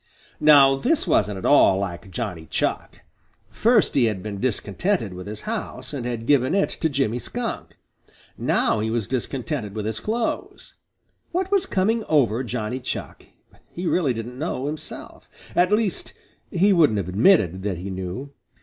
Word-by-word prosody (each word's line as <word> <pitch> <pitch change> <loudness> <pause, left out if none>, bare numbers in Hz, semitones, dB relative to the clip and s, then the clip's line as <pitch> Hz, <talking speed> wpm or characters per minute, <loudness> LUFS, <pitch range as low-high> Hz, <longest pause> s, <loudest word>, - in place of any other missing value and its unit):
Now 140 -3 +7
this 295 - +1
wasn't 105 -2 +1
at 95 - -6
all 120 -9 +5
like 95 -1 -4
Johnny 90 -6 -5
Chuck. - - -2 0.5
First 215 - +3
he 130 - +4
had 105 -5 -2
been 105 -2 -5
discontented 120 - -1
with 90 +1 -8
his 105 0 -6
house - - -5
and 125 -4 -4
had 115 -2 -4
given 130 +4 +3
it 200 - +2
to 160 - -1
Jimmy 135 -5 0
Skunk. 235 - -5 0.6
Now 110 - +1
he 110 +1 -1
was 115 -2 -1
discontented 125 -3 -3
with 105 -1 -3
his 110 0 -2
clothes. 225 +2 -3 0.6
What 370 +2 -1
was 390 -1 +2
coming 215 +4 +1
over 130 -6 +2
Johnny 125 0 -3
Chuck? 130 - -6 0.4
He 180 - -6
really 155 -8 +1
didn't 120 +3 -6
know 145 -4 -2
himself. 150 +1 -7 0.3
At 180 +2 +3
least, 210 -3 0 0.4
he 195 +3 +3
wouldn't 155 - +4
have 95 -3 -2
admitted 95 - +3
that 95 -3 -2
he 95 +3 -6
knew. 95 +10 -6
125 Hz, 160 wpm, -23 LUFS, 105-175 Hz, 0.6 s, Now